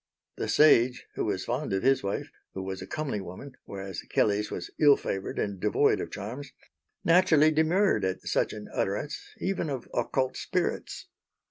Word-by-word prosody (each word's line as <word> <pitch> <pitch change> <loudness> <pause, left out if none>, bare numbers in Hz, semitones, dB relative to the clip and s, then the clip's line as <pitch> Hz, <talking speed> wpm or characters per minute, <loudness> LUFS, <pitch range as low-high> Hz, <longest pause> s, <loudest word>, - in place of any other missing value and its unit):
The - - -2
sage, 125 -5 +5
who - - -2
was - - -2
fond - - -2
of 95 - 0
his 135 +1 +4
wife 100 0 -3 0.2
who 95 - -4
was 95 0 -5
a - - -7
comely 145 -9 -3
woman, 95 +10 -9
whereas 95 -2 -6
Kelley's 105 0 +1
was 85 - -6
ill 145 -2 +7
favoured 95 0 -4
and 100 -2 -2
devoid 105 +3 +2
of - - -5
charms 130 +7 -7 0.5
naturally 165 -3 +5
demurred 160 - +2
at 95 0 -2
such - - +1
an 105 -1 -8
utterance 105 +10 -2 0.2
even 185 -4 -1
of 130 -4 -4
occult 130 +2 0
spirits. - - -2
125 Hz, 165 wpm, -28 LUFS, 100-150 Hz, 0.5 s, ill